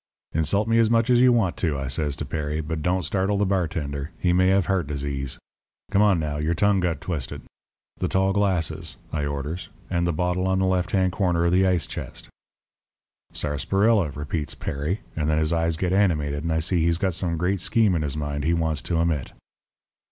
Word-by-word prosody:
"'Insult 90 Hz, +7 st, +1 dB
me 115 Hz, 0 st, +3 dB
as 115 Hz, -1 st, +4 dB
much 115 Hz, +2 st, +3 dB
as 120 Hz, 0 st, +5 dB
you 125 Hz, 0 st, +6 dB
want 110 Hz, -8 st, +2 dB
to,' 80 Hz, -5 st, -1 dB
I 70 Hz, -1 st, -3 dB
says 70 Hz, +2 st, -1 dB
to 75 Hz, -, -5 dB
Perry, 75 Hz, +1 st, -3 dB
'but 80 Hz, 0 st, -3 dB
don't 90 Hz, +3 st, 0 dB
startle 95 Hz, +5 st, 0 dB
the 100 Hz, -, +2 dB
bartender. 80 Hz, -6 st, -2 dB
He 90 Hz, -1 st, +1 dB
may 95 Hz, +1 st, +4 dB
have 95 Hz, -1 st, +3 dB
heart 95 Hz, -5 st, 0 dB
disease. 70 Hz, -2 st, -3 dB, 0.5 s
Come 100 Hz, -, +3 dB
on, 100 Hz, -4 st, +4 dB
now; 75 Hz, -2 st, -2 dB
your 80 Hz, +3 st, 0 dB
tongue 100 Hz, +3 st, +3 dB
got 90 Hz, -2 st, -1 dB
twisted. 75 Hz, -9 st, -4 dB, 0.6 s
The -, -, 0 dB
tall 95 Hz, 0 st, +2 dB
glasses,' 95 Hz, -5 st, -1 dB, 0.2 s
I 75 Hz, -2 st, -1 dB
orders, 70 Hz, +5 st, -4 dB, 0.2 s
'and 85 Hz, -1 st, +1 dB
the -, -, +2 dB
bottle 90 Hz, +3 st, 0 dB
in 95 Hz, -, +2 dB
the 95 Hz, -, +2 dB
left 90 Hz, -1 st, +1 dB
hand 95 Hz, -2 st, +2 dB
corner 90 Hz, -2 st, +1 dB
of 85 Hz, -, +2 dB
the 95 Hz, +1 st, +4 dB
ice 90 Hz, -5 st, +2 dB
chest.' -, -, -7 dB, 1.0 s
"'Sarsaparilla,' 95 Hz, -, +1 dB
repeats 75 Hz, +1 st, -3 dB
Perry, 75 Hz, +9 st, -3 dB
and 75 Hz, -1 st, -1 dB
then 75 Hz, -, +2 dB
his 80 Hz, +1 st, +1 dB
eyes 80 Hz, -1 st, +1 dB
get 90 Hz, +1 st, 0 dB
animated, 75 Hz, -7 st, +1 dB
and 85 Hz, -, -1 dB
I 80 Hz, 0 st, +1 dB
see 90 Hz, +1 st, +1 dB
he's 85 Hz, 0 st, +2 dB
got 95 Hz, 0 st, 0 dB
some 85 Hz, 0 st, -1 dB
great 90 Hz, +2 st, 0 dB
scheme 110 Hz, 0 st, +2 dB
in 85 Hz, -, 0 dB
his 75 Hz, 0 st, -3 dB
mind 75 Hz, -1 st, -3 dB
he 85 Hz, +3 st, +2 dB
wants 80 Hz, -4 st, 0 dB
to 85 Hz, -, -2 dB
emit. 80 Hz, -5 st, 0 dB
85 Hz, 210 wpm, -24 LUFS, 75-95 Hz, 1.0 s, you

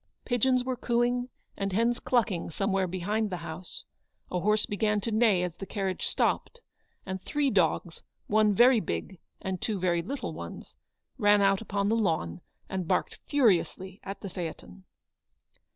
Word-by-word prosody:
Pigeons 250 Hz, +1 st, +2 dB
were 255 Hz, 0 st, -2 dB
cooing 245 Hz, +1 st, 0 dB, 0.3 s
and 195 Hz, -1 st, -2 dB
hens 235 Hz, +4 st, +2 dB
clucking 220 Hz, -8 st, 0 dB
some 195 Hz, +5 st, -1 dB
where 190 Hz, -1 st, +1 dB
behind 205 Hz, +5 st, -1 dB
the 180 Hz, -, -3 dB
house, 170 Hz, +2 st, -7 dB, 0.5 s
a 180 Hz, -, 0 dB
horse 210 Hz, +3 st, +2 dB
began 210 Hz, 0 st, +1 dB
to 230 Hz, -, -2 dB
neigh 215 Hz, -5 st, +4 dB
as 175 Hz, -2 st, -3 dB
the 195 Hz, -, -7 dB
carriage 195 Hz, -3 st, -2 dB
stopped, 485 Hz, -, 0 dB, 0.5 s
and 190 Hz, 0 st, -4 dB
three 290 Hz, +2 st, 0 dB
dogs, 170 Hz, -2 st, +1 dB, 0.2 s
one 215 Hz, 0 st, +4 dB
very 240 Hz, +4 st, +6 dB
big, 190 Hz, -3 st, -4 dB, 0.2 s
and 190 Hz, -2 st, -3 dB
two 210 Hz, -4 st, -1 dB
very 175 Hz, -2 st, +1 dB
little 265 Hz, +11 st, -4 dB
ones, -, -, -8 dB, 0.5 s
ran 205 Hz, -2 st, +5 dB
out 195 Hz, 0 st, +3 dB
upon 200 Hz, -2 st, -1 dB
the 220 Hz, -, +3 dB
lawn, 160 Hz, -, 0 dB, 0.3 s
and 185 Hz, -3 st, -3 dB
barked -, -, 0 dB
furiously 195 Hz, -, +2 dB
at 195 Hz, -, -6 dB
the 200 Hz, -, -5 dB
phaeton. 95 Hz, -, -7 dB
200 Hz, 160 wpm, -29 LUFS, 185-230 Hz, 0.5 s, very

